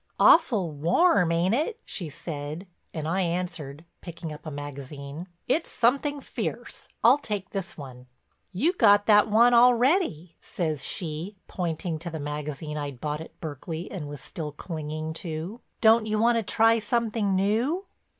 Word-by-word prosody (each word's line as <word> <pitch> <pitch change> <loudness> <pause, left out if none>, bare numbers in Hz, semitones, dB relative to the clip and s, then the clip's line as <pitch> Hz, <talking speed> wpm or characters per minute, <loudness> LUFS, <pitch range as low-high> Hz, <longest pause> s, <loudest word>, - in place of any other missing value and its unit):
"Awful 220 - +5
warm, 175 - +3
ain't 170 +4 +2
it?" 320 - -1
she 170 -6 -4
said, 155 +2 -6 0.3
and 155 -2 -4
I 185 +4 +1
answered, 170 -4 -3 0.2
picking 165 -2 -7
up 150 - -11
a - - -2
magazine: 145 +2 -7 0.2
"It's 315 +6 +1
something 280 +4 +1
fierce. - - -5
I'll 255 +5 +7
take 205 -7 -4
this 195 -2 -5
one." 130 -3 -10 0.4
"You 305 - +1
got 205 - +5
that 210 0 +5
one 235 +3 +5
already," 240 - +3
says 155 -6 -3
she, 165 +6 -3
pointing 165 -2 -3
to 170 +2 -5
the 160 -1 -5
magazine 150 +1 -4
I'd 140 -4 -5
bought 150 +1 -3
at 160 - -12
Berkeley 160 +2 -6
and 165 -7 -5
was 145 -1 -8
still 155 -3 -5
clinging 155 0 -5
to. 170 +7 -5 0.2
"Don't 220 0 +5
you 215 0 0
wanna 230 +1 +3
try 225 +2 +3
something 215 -2 0
new?" 230 - +1
175 Hz, 150 wpm, -26 LUFS, 155-225 Hz, 0.4 s, I'll